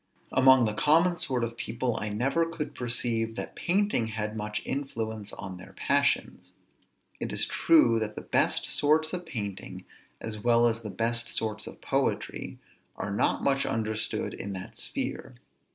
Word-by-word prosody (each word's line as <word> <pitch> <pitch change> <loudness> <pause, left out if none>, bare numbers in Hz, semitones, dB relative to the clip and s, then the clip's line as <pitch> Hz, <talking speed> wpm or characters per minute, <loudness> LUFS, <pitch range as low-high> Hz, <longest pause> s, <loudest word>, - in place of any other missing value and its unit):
Among 130 -2 +6
the 105 - 0
common 165 +9 +3
sort 125 -3 -1
of 115 0 -3
people, 120 +1 -2
I 105 - -2
never 130 +10 +1
could 155 -3 -5
perceive 115 -3 -1
that - - -6
painting 190 - +1
had 110 -1 -3
much 105 0 -3
influence 110 -6 -3
on 95 -2 -7
their 90 - -12
passions. - - 0 0.7
It - - -3
is - - +1
true 120 -9 +4
that 105 -1 -3
the - - -5
best - - +2
sorts 155 +2 +3
of 180 -1 -4
painting, 100 -6 -5 0.3
as 110 -1 -4
well 120 0 +5
as 115 -1 +1
the 110 - -6
best 115 +4 0
sorts 110 -1 -2
of - - -10
poetry, - - -1 0.4
are 100 - -4
not 100 - +1
much 135 0 +3
understood 110 -1 -1
in 100 - -5
that 95 -1 -7
sphere. - - -3
115 Hz, 160 wpm, -28 LUFS, 105-135 Hz, 0.7 s, Among